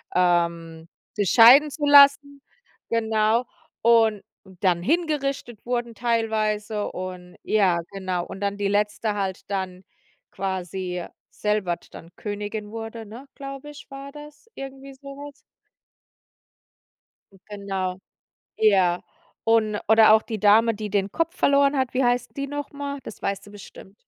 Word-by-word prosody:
ähm, 170 Hz, -2 st, 0 dB, 0.3 s
sich 205 Hz, -4 st, 0 dB
scheiden 255 Hz, +8 st, +8 dB
zu 295 Hz, +1 st, -4 dB
lassen, 285 Hz, 0 st, +6 dB, 0.5 s
genau. 220 Hz, +1 st, +1 dB, 0.4 s
Und 225 Hz, -3 st, +4 dB, 0.4 s
dann 180 Hz, -3 st, +2 dB
hingerichtet 275 Hz, -, -2 dB
wurden 240 Hz, -1 st, -2 dB
teilweise 215 Hz, -2 st, -1 dB
und 180 Hz, -1 st, -8 dB
ja, 195 Hz, -5 st, +2 dB
genau. 185 Hz, -3 st, -3 dB
Und -, -, -9 dB
dann 200 Hz, 0 st, -2 dB
die 205 Hz, -1 st, -1 dB
Letzte 210 Hz, +1 st, 0 dB
halt 195 Hz, -2 st, -3 dB
dann 190 Hz, -1 st, -4 dB, 0.5 s
quasi 185 Hz, -2 st, -4 dB, 0.2 s
selber 210 Hz, -5 st, -2 dB
d -, -, -23 dB
dann 165 Hz, -, -12 dB
Königin 210 Hz, 0 st, -5 dB
wurde, 225 Hz, 0 st, -7 dB
ne, 235 Hz, +7 st, -11 dB
glaube 275 Hz, +1 st, -8 dB
ich, 295 Hz, 0 st, -12 dB
war 275 Hz, 0 st, -8 dB
das 295 Hz, +4 st, -13 dB
irgendwie 270 Hz, 0 st, -9 dB
so 275 Hz, +1 st, -15 dB
was. 285 Hz, +1 st, -9 dB, 2.2 s
Genau, 195 Hz, -3 st, -4 dB, 0.6 s
ja 190 Hz, -5 st, +3 dB, 0.4 s
und 220 Hz, -2 st, +2 dB
oder 220 Hz, 0 st, +7 dB
auch 220 Hz, -, +5 dB
die 220 Hz, -3 st, -6 dB
Dame, 220 Hz, +3 st, +5 dB
die 210 Hz, 0 st, -6 dB
den 195 Hz, 0 st, -1 dB
Kopf 330 Hz, +2 st, -1 dB
verloren 280 Hz, 0 st, +3 dB
hat, 260 Hz, -1 st, -1 dB
wie 260 Hz, +1 st, +2 dB
heißt 245 Hz, 0 st, 0 dB
die 275 Hz, 0 st, -3 dB
noch 290 Hz, 0 st, -5 dB
mal? 285 Hz, 0 st, -5 dB
Das -, -, -10 dB
weißt 200 Hz, 0 st, -3 dB
du -, -, -13 dB
bestimmt. 200 Hz, -1 st, -13 dB
215 Hz, 135 wpm, -24 LUFS, 195-270 Hz, 2.2 s, scheiden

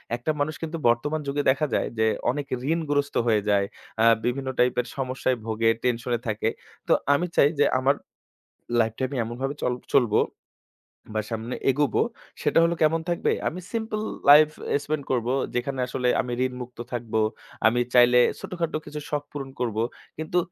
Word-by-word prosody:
একটা 120 Hz, +6 st, -1 dB
মানুষ 150 Hz, +1 st, 0 dB
কিন্তু 165 Hz, 0 st, -4 dB
বর্তমান 145 Hz, +7 st, +1 dB
যুগে 145 Hz, +1 st, 0 dB
দেখা 140 Hz, +3 st, +2 dB
যায় -, -, +1 dB
যে 110 Hz, -, +3 dB, 0.3 s
অনেক 145 Hz, +1 st, -4 dB, 0.3 s
ঋণগ্রস্থ 145 Hz, -3 st, -1 dB
হয়ে 110 Hz, -2 st, +3 dB
যায়। 100 Hz, -1 st, +3 dB, 0.4 s
আ -, -, +6 dB, 0.2 s
বিভিন্ন 130 Hz, +2 st, -1 dB
টাইপের 125 Hz, 0 st, +2 dB
সমস্যায় 130 Hz, -1 st, -1 dB
ভোগে, 115 Hz, 0 st, +1 dB
টেনশনে 120 Hz, -1 st, 0 dB
থাকে। 110 Hz, 0 st, 0 dB, 0.4 s
তো -, -, +5 dB, 0.2 s
আমি 170 Hz, +5 st, +1 dB
চাই 140 Hz, -, +6 dB
যে 145 Hz, -, +6 dB
আমার 135 Hz, +2 st, +3 dB, 0.9 s
লাইফটা 115 Hz, +2 st, -1 dB
আমি 140 Hz, -, -5 dB
এমনভাবে 130 Hz, +5 st, -3 dB
চাল 125 Hz, -, +1 dB, 0.2 s
চলব 120 Hz, -5 st, +4 dB, 1.0 s
বা, 110 Hz, -, 0 dB
সামনে 115 Hz, +2 st, -3 dB
এগোবো। 135 Hz, -2 st, +2 dB, 0.4 s
সেটা -, -, +3 dB
হলো 170 Hz, +1 st, +2 dB
কেমন 160 Hz, +1 st, +3 dB
থাকবে? 170 Hz, -, +1 dB, 0.2 s
আমি 175 Hz, -, -3 dB
সিম্পল 220 Hz, -2 st, -2 dB, 0.3 s
লাইফ 150 Hz, +1 st, +9 dB, 0.3 s
এ -, -, +5 dB
স্পেন্ড 150 Hz, -1 st, -2 dB
করব। 120 Hz, -3 st, 0 dB, 0.3 s
যেখানে 130 Hz, +2 st, -2 dB
আসলে 125 Hz, 0 st, -1 dB
আমি 125 Hz, -2 st, -6 dB
ঋণমুক্ত 125 Hz, -1 st, -6 dB
থাকবো। 115 Hz, -2 st, -2 dB, 0.5 s
আমি 120 Hz, +2 st, +2 dB
চাইলে 125 Hz, 0 st, +6 dB, 0.2 s
ছোটখাটো 170 Hz, -3 st, -3 dB
কিছু 150 Hz, 0 st, -6 dB
শখ 145 Hz, -1 st, -1 dB
পূরণ 135 Hz, -2 st, -6 dB
করব। 115 Hz, -4 st, -2 dB, 0.4 s
কিন্তু 160 Hz, +3 st, -2 dB
130 Hz, 160 wpm, -25 LUFS, 120-150 Hz, 1.0 s, লাইফ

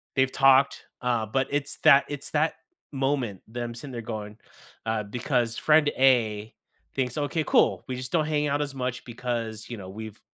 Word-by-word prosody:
They've 130 Hz, 0 st, +3 dB
talked, 135 Hz, 0 st, +4 dB, 0.2 s
uh, 120 Hz, -3 st, 0 dB
but 135 Hz, +5 st, 0 dB
it's 145 Hz, 0 st, -1 dB
that 140 Hz, 0 st, +7 dB
it's 145 Hz, -1 st, -5 dB
that 155 Hz, +1 st, +1 dB, 0.4 s
moment, 135 Hz, -7 st, -1 dB
them 120 Hz, +1 st, -5 dB
sitting 135 Hz, +3 st, -8 dB
there 120 Hz, -, -4 dB
going 105 Hz, -2 st, -6 dB, 0.5 s
uh, 110 Hz, -1 st, 0 dB
because 120 Hz, +2 st, -1 dB
friend 150 Hz, -1 st, +4 dB
A 115 Hz, -5 st, +3 dB, 0.4 s
thinks, 130 Hz, 0 st, -1 dB
"Okay, 150 Hz, +2 st, 0 dB
cool, -, -, +3 dB
we 130 Hz, -, -3 dB
just 125 Hz, 0 st, -6 dB
don't 160 Hz, -3 st, +2 dB
hang 150 Hz, -1 st, +1 dB
out 145 Hz, 0 st, 0 dB
as 140 Hz, -2 st, -3 dB
much 125 Hz, -1 st, -3 dB
because," 115 Hz, -2 st, -4 dB
you 120 Hz, -, -5 dB
know, 95 Hz, -2 st, -9 dB
"we've 110 Hz, +2 st, -8 dB
125 Hz, 180 wpm, -26 LUFS, 115-140 Hz, 0.5 s, that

